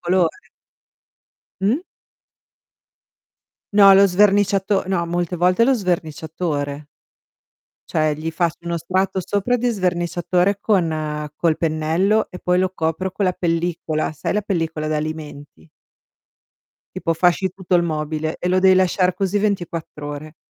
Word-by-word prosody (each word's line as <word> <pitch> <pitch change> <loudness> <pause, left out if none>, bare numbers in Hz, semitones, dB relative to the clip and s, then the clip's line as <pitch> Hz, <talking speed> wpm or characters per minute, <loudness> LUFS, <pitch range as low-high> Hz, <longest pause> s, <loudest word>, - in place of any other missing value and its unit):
colore. 180 - 0 1.1
Mh. 205 +5 +3 2.0
No 200 -1 +8
lo 200 +1 +7
sverniciato 195 0 +2
no, 175 -3 0
molte 175 +1 -2
volte 180 +6 +3
lo 270 - +4
sverniciatore. 160 - -3 1.0
Cioè, 155 -1 +1
gli 160 +2 -4
faccio 170 0 -1
uno 170 0 -3
strato 190 +3 -1
sopra 205 +7 0
di 245 +1 0
sverniciatore 180 -1 0
con 155 -6 -1
col 165 -2 +1
pennello 165 +7 +1
e 180 - -8
poi 180 0 +1
lo 185 0 +1
copro 165 +3 -2
con 195 +1 -1
la 185 - +2
pellicola, 165 -3 -2
sai 150 +4 -3
la 210 - +1
pellicola 165 -6 -2
d'alimenti? 150 - -5 1.3
Tipo 165 - -1
fasci 180 +3 +2
tutto 185 0 -2
il 175 - +3
mobile 155 0 -3
e 180 - -2
lo 185 +1 +3
devi 190 0 +5
lasciar 185 0 +2
così 195 +1 -1
24 175 -7 -3
ore. 150 +2 -8
175 Hz, 130 wpm, -20 LUFS, 155-190 Hz, 2.0 s, No